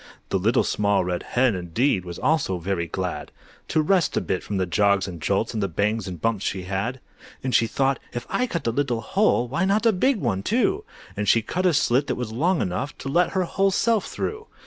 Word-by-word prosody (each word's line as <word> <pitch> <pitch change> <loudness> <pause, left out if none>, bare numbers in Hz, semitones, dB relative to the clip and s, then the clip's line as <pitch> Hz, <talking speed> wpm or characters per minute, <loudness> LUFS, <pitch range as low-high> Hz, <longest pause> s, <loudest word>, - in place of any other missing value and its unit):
The 95 - +1
Little 110 +6 +3
Small 100 -3 +1
Red 90 -1 -2
Hen, 125 -1 +1
indeed, 90 - 0
Was 85 -1 -7
also 155 - +1
very 85 -1 -2
glad - - -4 0.4
To 155 -1 +1
rest 180 +1 +2
a - - +2
bit 90 - -2
from 100 - -4
the 95 - +1
jogs 100 +2 +2
and 85 -4 -8
jolts' 100 +7 0
And 110 - -2
the 100 - +1
bangs 100 +4 -1
and 90 -3 -6
bumps 105 +3 0
she'd 95 -1 -2
had. 100 +8 -3 0.4
And 130 -1 -2
she 115 - +4
thought, 135 +3 0
"If 120 0 -5
I 250 - 0
cut 170 -8 -4
a 115 - +2
little 125 -2 -1
hole, 155 - +2
Why 150 +9 -1
not 200 +4 +2
a 230 - +6
big 255 +8 +2
one 110 - -1
too?" 225 - +1 0.3
And 105 -1 -1
she 115 - +4
cut 185 +10 0
a 175 - +3
slit 135 +2 +2
that 125 - -1
was 120 -3 -4
long 165 +9 +1
enough 95 +11 -3
To 135 - -6
let 175 +5 +2
her 190 -1 +1
whole 195 +3 +1
self 220 +2 +1
through! 440 +1 -4
120 Hz, 230 wpm, -24 LUFS, -, 0.4 s, a